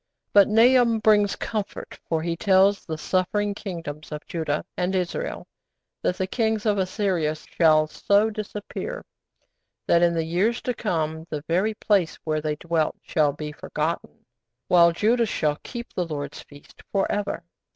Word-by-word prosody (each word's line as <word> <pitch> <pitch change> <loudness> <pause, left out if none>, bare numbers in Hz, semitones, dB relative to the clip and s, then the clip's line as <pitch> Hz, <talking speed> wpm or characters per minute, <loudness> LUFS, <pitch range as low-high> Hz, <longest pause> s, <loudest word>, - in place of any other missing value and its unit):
But 200 -1 +7
Nahum 235 +1 +5
brings 210 -2 +3
comfort, 215 -3 -5
for 160 -1 0
he 170 0 -1
tells 195 +2 +3
the 160 -2 -3
suffering 200 +5 0
Kingdoms 165 -7 -7
of 150 0 -6
Judah 155 -3 -2
and 180 +1 -1
Israel 180 -2 -2 0.6
that 180 - 0
the 190 - 0
Kings 220 +1 -1
of 205 -2 +2
Assyria 185 -5 0
shall 155 0 +3
so 205 +7 +2
disappear 215 - -6 0.8
that 170 - +4
in 170 -1 +3
the 165 -1 0
years 195 +9 +1
to 250 - -1
come 160 -7 -2
the 150 -2 -4
very 190 +6 +1
place 195 -6 +1
where 155 -1 -1
they 150 0 -1
dwelt 165 0 -1
shall 150 -4 +2
be 150 +1 -6
forgotten, 155 +2 -4 0.4
while 170 -1 +6
Judah 225 +6 +2
shall 150 -6 0
keep 240 -1 -8
the 180 - -1
Lord's 145 -2 -5
feasts 145 0 -16
for 195 -1 +2
ever. 205 -4 -2
180 Hz, 155 wpm, -24 LUFS, 160-210 Hz, 0.8 s, But